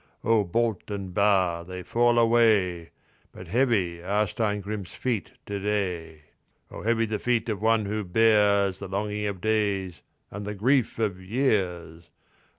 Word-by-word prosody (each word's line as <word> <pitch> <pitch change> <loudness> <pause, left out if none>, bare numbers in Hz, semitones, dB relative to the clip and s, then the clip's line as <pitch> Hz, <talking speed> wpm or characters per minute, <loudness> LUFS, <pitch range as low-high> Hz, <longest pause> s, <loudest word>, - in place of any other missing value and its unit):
"O 110 -1 +3
bolt 110 +3 -1
and 100 -3 -5
bar 95 -4 +2
they 90 +1 -8
fall 120 +3 +2
away, 110 -8 +3 0.4
But 90 - -11
heavy 100 -7 +1
are 100 +4 +1
Steingrim's 105 -1 -3
feet 120 -5 -3
to 100 -1 -4
day." 90 -6 -3 0.5
"O - - -8
heavy 115 +2 +1
the 110 -1 -3
feet 120 -1 0
of 105 -2 -3
one 110 -1 +2
who 105 +1 -2
bears 100 -1 +3
The 100 - -6
longing 105 +2 -2
of 100 -3 -5
days 100 -4 -1 0.3
and 100 +1 -6
the 105 +1 -5
grief 125 +4 +1
of 100 -5 -2
years! 95 -7 -1
105 Hz, 150 wpm, -26 LUFS, 95-110 Hz, 0.5 s, O